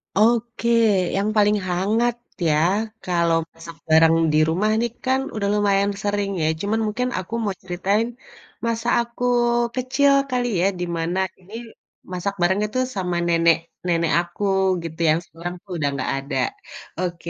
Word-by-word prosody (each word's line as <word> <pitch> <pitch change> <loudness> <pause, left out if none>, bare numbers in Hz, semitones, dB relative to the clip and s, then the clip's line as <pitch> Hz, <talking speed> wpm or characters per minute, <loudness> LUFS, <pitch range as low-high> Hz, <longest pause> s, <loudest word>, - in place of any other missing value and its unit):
Oke, 235 +2 +2 0.5
yang 200 +2 +1
paling 210 0 +4
hangat 215 +7 +1 0.3
ya, 150 - +3 0.5
kalau 170 -2 +2
masak 165 0 -11
bareng 160 +1 +6 0.2
di - - +4
rumah 200 +6 +1
nih 235 -1 -1
kan, 260 +1 +2 0.2
udah 205 -2 -1
lumayan 200 -1 +2
sering 205 -1 -1
ya, 155 - +2
cuman 210 +2 0
mungkin 250 +4 -1
aku 185 +4 -8
mau 205 - 0
ceritain 195 +5 0 0.6
masa 230 0 -2
aku 235 +1 -7 0.5
kecil 265 +2 +2 0.2
kali 250 -2 0 0.2
ya, - - +4
di 175 - -1
mana 170 +3 -1 0.2
ini, 190 +3 -17 0.6
masak 185 +2 -2
barengnya 190 +4 +2
tuh 255 - +2
sama 180 -2 -2
nenek 165 -1 +4 0.3
nenek 170 -2 +1
aku 175 +3 -8 0.4
gitu, 165 -1 -7
yang 155 +2 +3
sekarang 175 +2 -7
tuh 195 - -13
udah 145 - 0
nggak 130 - -2
ada. 135 +2 -4 0.6
Oke. 175 -2 -3
195 Hz, 155 wpm, -22 LUFS, 170-220 Hz, 0.6 s, bareng